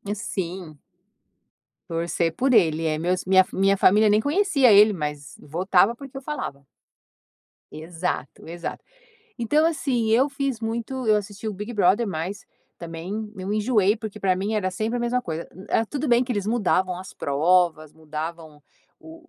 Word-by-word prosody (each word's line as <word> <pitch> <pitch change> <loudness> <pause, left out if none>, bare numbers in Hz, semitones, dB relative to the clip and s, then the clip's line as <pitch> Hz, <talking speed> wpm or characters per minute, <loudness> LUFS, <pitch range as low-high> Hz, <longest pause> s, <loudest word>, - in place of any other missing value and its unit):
Sim. 180 -5 -5 1.1
Torcer 165 0 -1
por 265 +1 +1
ser 220 - +8
ele. 160 -1 -1
É, 155 -1 0
meus 180 +2 -1
minha 190 0 +6
minha 195 +1 +2
família 210 +3 +5
nem 210 +1 +4
conhecia 285 - +3
ele, 210 +1 +7
mas 150 -4 -5
votava, 185 +7 +2
porque 270 +1 -11
eu 270 - -6
falava. 140 - -5 1.1
Exato, 165 -2 -5
exato. 170 +1 -6 0.5
Então, 300 +7 +2
assim, 260 -8 0
eu 260 +6 +4
fiz 275 -4 -3
muito 235 +3 -4
eu 215 -1 +5
assisti 205 +1 -6
o 215 - -2
Big 210 +5 -6
Brother, 205 +3 +3
mas 185 +3 -4 0.3
também 180 +6 -6
eu 190 +2 -4
enjoei, 210 -1 +2
porque 215 -1 -7
para 185 -2 +2
mim 205 +4 -2
era 185 -3 0
sempre 220 +6 -2
a - - -2
mesma 240 +1 0
coisa. 165 -3 -5 0.2
Era 225 - +2
tudo 290 +2 -3
bem 240 +1 +4
que 245 - -3
eles 205 -2 -2
mudavam 190 -5 +1
as 190 - -10
provas, 155 +1 +1
mudavam 160 0 -7 0.4
o 330 +1 -14
200 Hz, 160 wpm, -24 LUFS, 170-235 Hz, 1.1 s, ser